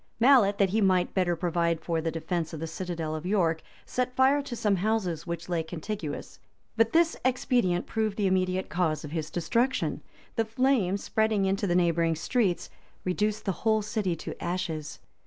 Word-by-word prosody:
Mallet, 235 -5 +5
that 195 -2 +2
he 220 +2 +2
might 185 -2 +2
better 180 -2 +1
provide 170 -1 0
for 165 0 -1
the 165 - -1
defence 165 0 -3
of 160 - -5
the 165 - -3
citadel 165 -1 -4
of 155 - -5
York, 175 -4 +1 0.2
set 250 0 -2
fire 270 +2 +4
to 270 -3 -6
some 210 -4 +1
houses 185 -5 -1
which 170 0 -4
lay 175 -2 0
contiguous; 160 0 -6 0.4
but 225 0 +3
this 330 0 +3
expedient 245 -8 +1
proved 220 -2 -1
the 205 - +1
immediate 185 0 +1
cause 165 -3 0
of 150 - -8
his 160 -1 -3
destruction. 235 +10 0 0.4
The 225 - +2
flames, 225 -5 +1
spreading 220 -2 +1
into 195 +1 0
the 175 - +1
neighboring 170 -2 +2
streets, 190 +2 0 0.4
reduced 210 +3 -1
the 195 - +1
whole 220 -1 +2
city 210 -5 -1
to 160 - -7
ashes. 165 -4 -3
185 Hz, 175 wpm, -28 LUFS, 170-220 Hz, 0.4 s, Mallet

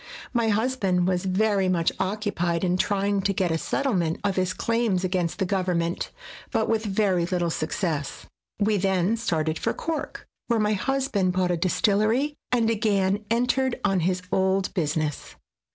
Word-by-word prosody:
My 235 -2 +2
hus 225 +5 +1
band 185 -6 +1
was 180 0 0
very 195 0 +2
much 170 -3 +2
occupied 190 -4 -1
in 180 -1 +2
trying 200 +1 +1
to 195 +1 0
get 185 -2 0
a 160 - +1
settlement 185 - 0
of 200 -2 0
his 185 0 +1
claims 230 -3 0
against 180 -2 -1
the 195 - 0
government, 180 -3 -1 0.4
but - - 0
with 225 0 0
very 190 -4 +1
little 175 -2 0
success. 155 -2 -3 0.3
We 210 0 +2
then 190 +2 +1
started 160 -8 -1
for - - 0
Cork, 325 -1 -4 0.2
where 235 -2 +2
my 210 0 +2
husband 210 -5 0
bought 180 -1 +1
a - - +2
distillery, 215 - +2 0.2
and 235 -2 +2
again 205 -2 +1
entered 250 +2 +1
on 195 -2 +2
his 180 +2 0
old 190 0 +1
business. 155 -4 -2
190 Hz, 160 wpm, -25 LUFS, 180-215 Hz, 0.4 s, My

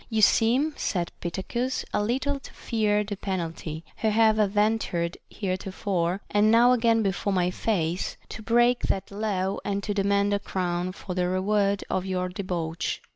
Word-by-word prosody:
You 220 -2 +1
seem, 255 +10 +4
said 175 -4 -1
Pittacus, 235 +9 -2
a - - +2
little 270 +6 0
to - - -13
fear 210 -2 0
the 205 0 -4
pen 190 -1 -2
alty, 160 -1 -5
who 220 - +1
have 220 0 +4
adventured 205 -4 +1
heretofore, 185 -1 -2
and 210 +1 +3
now 235 +2 +6
again 230 -2 +3
before 200 +1 -1
my 180 -1 +2
face, 180 -4 -1
to 220 - -7
break 240 +2 +3
that 195 - -1
law 200 -2 -1
and 200 0 -2
to 205 - -1
demand 200 0 +2
a 200 - +1
crown 180 -2 -2
for 185 0 -7
the 180 0 0
reward 200 +2 +1
of 185 0 -2
your 185 -1 -1
debauch. 175 -4 -3
200 Hz, 165 wpm, -26 LUFS, 185-220 Hz, -, now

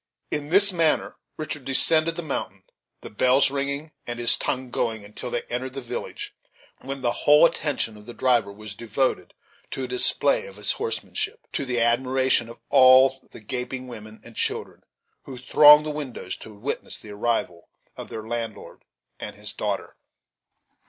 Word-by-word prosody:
In 150 0 -3
this 200 +3 +4
manner 165 -3 +1 0.2
Richard 150 -2 -5
descended 155 +5 +4
the 175 - -5
mountain; 95 -10 -5 0.4
the - - -9
bells 130 +5 +3
ringing, 140 +2 -3 0.2
and 120 0 -4
his 120 0 +7
tongue 130 -2 -2
going, 110 -4 -2
until 105 +4 -7
they 120 - -2
entered 130 +2 -5
the 135 - -5
village, 120 - -6 0.5
when 135 0 -7
the 120 - +2
whole 150 +6 +5
attention 145 -9 -1
of 105 - -15
the 120 - -8
driver 120 -6 +2
was 110 +1 -10
devoted 115 +5 -2 0.3
to 135 - -5
a - - -3
display 465 - +1
of - - -12
his - - -1
horsemanship, 445 0 -4
to 140 - -2
the 125 -2 -1
admiration 125 +1 +2
of 115 - -11
all 130 +1 +6
the - - -12
gaping 125 +3 -5
women 110 -2 -11
and 115 -1 -14
children - - -3 0.4
who 130 - -9
thronged 150 +4 +7
the 155 - -2
windows 145 -4 -6
to 110 - -12
witness 110 +7 -5
the 105 - -12
arrival 105 -5 -2 0.3
of - - -9
their 110 0 -7
landlord 115 -2 -6 0.4
and 105 - -7
his 105 0 -6
daughter. 100 -2 -4
130 Hz, 165 wpm, -24 LUFS, 115-140 Hz, 0.5 s, his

